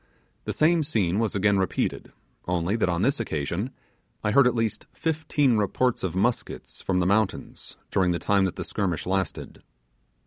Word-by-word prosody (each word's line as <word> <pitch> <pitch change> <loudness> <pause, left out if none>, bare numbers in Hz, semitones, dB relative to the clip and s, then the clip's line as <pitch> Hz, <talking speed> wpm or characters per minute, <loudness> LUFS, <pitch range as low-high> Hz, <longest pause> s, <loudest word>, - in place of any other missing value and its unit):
The - - -2
same 165 +2 +3
scene 105 - 0
was 110 -2 0
again 100 0 +3
repeated, 95 - -2 0.4
only 90 +3 0
that 110 -5 +1
on 85 +2 0
this 140 +3 +2
occasion 85 - -2 0.5
I 105 - +1
heard 135 +3 +6
at 125 - +1
least 115 -2 -2
fifteen 150 -6 +1
reports 115 +4 0
of 90 -2 -2
muskets 115 +6 -2
from 90 -1 0
the 90 - +1
mountains 100 +1 -1
during 95 -2 +2
the 85 - +1
time 100 +2 +2
that 95 - -2
the - - -4
skirmish 90 -6 -2
lasted. 95 0 -3
100 Hz, 170 wpm, -26 LUFS, 90-120 Hz, 0.5 s, heard